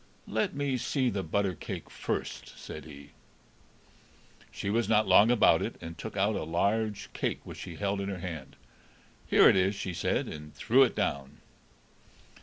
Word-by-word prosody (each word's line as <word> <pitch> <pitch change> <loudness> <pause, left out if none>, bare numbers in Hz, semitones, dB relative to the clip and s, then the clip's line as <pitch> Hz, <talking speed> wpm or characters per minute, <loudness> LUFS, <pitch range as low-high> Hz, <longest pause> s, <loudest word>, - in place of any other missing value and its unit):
"Let 110 +5 -1
me 140 -2 0
see 130 0 0
the 100 - -2
butter 95 +2 0
cake - - -7
first," - - -4
said 75 - -8
he. 70 -2 -12 1.4
She 100 - -3
was 115 +2 +1
not 110 0 +4
long 100 +4 +7
about 120 -3 +5
it, - - -3
and 80 0 -8
took 105 +5 -7
out 100 +2 +2
a - - -2
large 100 +6 -1
cake, - - -2
which - - -9
she - - -7
held 100 0 -1
in 100 - -3
her 95 - -4
hand. 85 -6 -7 0.7
"Here - - +6
it - - +6
is," 95 +2 +2
she 100 -2 -4
said, 85 - 0
and 75 -1 -9
threw 120 - +3
it 130 - +4
down. 70 +1 -2
100 Hz, 175 wpm, -29 LUFS, 80-110 Hz, 1.4 s, long